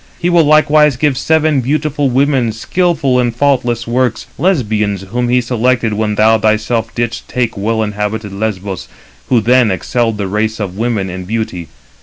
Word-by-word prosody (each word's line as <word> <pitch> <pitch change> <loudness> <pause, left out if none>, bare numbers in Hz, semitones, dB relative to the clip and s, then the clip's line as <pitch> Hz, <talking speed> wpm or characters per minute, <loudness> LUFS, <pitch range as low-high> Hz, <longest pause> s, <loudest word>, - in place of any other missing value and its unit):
He 175 0 0
will 170 -1 +5
likewise 150 -2 +4
give 145 0 +1
seven 155 0 +1
beautiful 145 +1 0
women, 130 -3 +1
skilful 140 +1 0
in 120 -1 +1
faultless 120 -2 0
works, 125 +1 -1
Lesbians, 105 - 0
whom 120 +5 -2
he 125 +1 +3
selected 120 -1 0
when 105 0 -1
thou 110 +1 +4
thyself 110 +1 0
didst 120 -1 -3
take 125 -2 -1
well 110 +2 -1
inhabited 105 0 -3
Lesbos, 100 -2 -4 0.4
who 125 - +4
then 125 +1 +3
excelled 115 +3 -1
the 100 - -2
race 110 +3 -2
of 95 -3 -4
women 110 -3 -1
in 95 0 -6
beauty. 100 -5 -4
115 Hz, 160 wpm, -14 LUFS, 105-130 Hz, 0.4 s, will